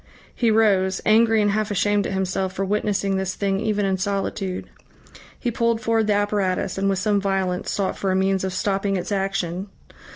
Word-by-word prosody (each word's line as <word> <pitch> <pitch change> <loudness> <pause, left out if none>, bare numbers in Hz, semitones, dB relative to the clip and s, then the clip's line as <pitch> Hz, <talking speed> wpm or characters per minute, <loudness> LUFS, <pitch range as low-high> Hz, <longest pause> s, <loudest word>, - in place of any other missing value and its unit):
He 235 - +1
rose, 195 -4 +3
angry 220 0 +4
and 205 - +2
half 215 +1 0
ashamed 205 0 +1
at - - -4
himself 190 0 -1
for 195 +1 -2
witnessing 200 -1 0
this 190 0 -2
thing 195 -1 0
even 210 -1 0
in 190 -1 0
solitude. 195 -1 -2 0.7
He 240 - -1
pulled 230 -1 +1
forward 225 -1 +1
the 210 - +3
apparatus, 205 -3 0
and 195 0 +1
with 195 - +1
some 205 +1 +1
violence 190 -2 -1
sought 195 -2 -1
for 195 - -1
a - - +1
means 190 0 +1
of 190 - -1
stopping 195 +1 0
its 180 - -5
action. 195 -2 -2
195 Hz, 190 wpm, -23 LUFS, 190-210 Hz, 0.7 s, angry